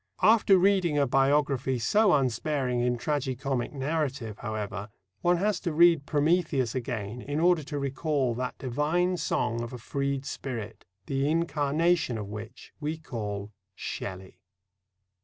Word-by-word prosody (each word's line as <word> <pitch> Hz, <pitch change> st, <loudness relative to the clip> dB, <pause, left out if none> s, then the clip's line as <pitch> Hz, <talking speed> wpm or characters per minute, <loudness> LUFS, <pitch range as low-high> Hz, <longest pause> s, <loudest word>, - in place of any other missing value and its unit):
After 215 Hz, -3 st, +6 dB
reading 185 Hz, -4 st, +3 dB
a 140 Hz, -, +4 dB
biography 135 Hz, 0 st, +2 dB
so 205 Hz, -, +3 dB
unsparing 130 Hz, -1 st, 0 dB
in 120 Hz, 0 st, +1 dB
tragi 140 Hz, 0 st, -1 dB
comic 130 Hz, -1 st, -2 dB
narrative, 135 Hz, -6 st, -2 dB
however, 105 Hz, -2 st, -4 dB, 0.3 s
one 175 Hz, 0 st, +3 dB
has 200 Hz, 0 st, +1 dB
to 175 Hz, -, -2 dB
read 165 Hz, -2 st, +5 dB
Prometheus 150 Hz, -5 st, +1 dB
again 120 Hz, -3 st, -4 dB
in 145 Hz, +3 st, -3 dB
order 175 Hz, -1 st, +4 dB
to 145 Hz, 0 st, -4 dB
recall 140 Hz, -2 st, 0 dB
that 125 Hz, +2 st, -4 dB
divine 155 Hz, +8 st, 0 dB
song 115 Hz, -7 st, -1 dB
of 120 Hz, +1 st, -6 dB
a -, -, -5 dB
freed 140 Hz, +3 st, -2 dB
spirit, 115 Hz, -7 st, -6 dB, 0.2 s
the 135 Hz, +1 st, 0 dB
incarnation 160 Hz, -3 st, +1 dB
of 105 Hz, -, -4 dB
which 110 Hz, +3 st, -9 dB
we 155 Hz, +1 st, -3 dB
call 105 Hz, -9 st, -5 dB, 0.2 s
Shelley. 95 Hz, -1 st, -6 dB
140 Hz, 140 wpm, -28 LUFS, 120-160 Hz, 0.3 s, After